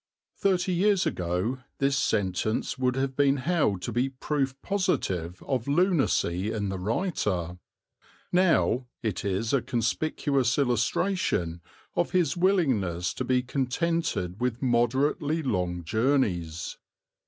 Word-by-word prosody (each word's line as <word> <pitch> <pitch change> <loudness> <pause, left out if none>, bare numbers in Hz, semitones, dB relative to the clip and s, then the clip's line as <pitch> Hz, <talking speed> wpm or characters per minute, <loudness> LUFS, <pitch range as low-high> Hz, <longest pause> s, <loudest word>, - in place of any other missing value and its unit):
Thirty 185 -1 +1
years 195 +2 +3
ago 90 +9 -1 0.2
this 140 0 +2
sentence 110 -4 0
would 130 -1 0
have 135 0 -1
been 140 0 +3
held 130 - 0
to - - -3
be 125 +3 +1
proof 135 0 -2
positive 110 - -1
of 130 -3 -2
lunacy 140 - +2
in 105 -3 -2
the 95 -1 -3
writer; 95 - -1 0.7
now 170 -8 +3 0.2
it 110 -5 -2
is 100 +4 -1
a 135 - +3
conspicuous 130 +2 0
illustration 120 - 0 0.3
of - - 0
his 180 0 +2
willingness 130 - +1
to - - -3
be 125 0 +1
contented 130 - -1
with 125 -1 0
moderately 135 +6 +1
long 90 -8 -1
journeys. 90 - 0
125 Hz, 120 wpm, -27 LUFS, 95-150 Hz, 0.7 s, years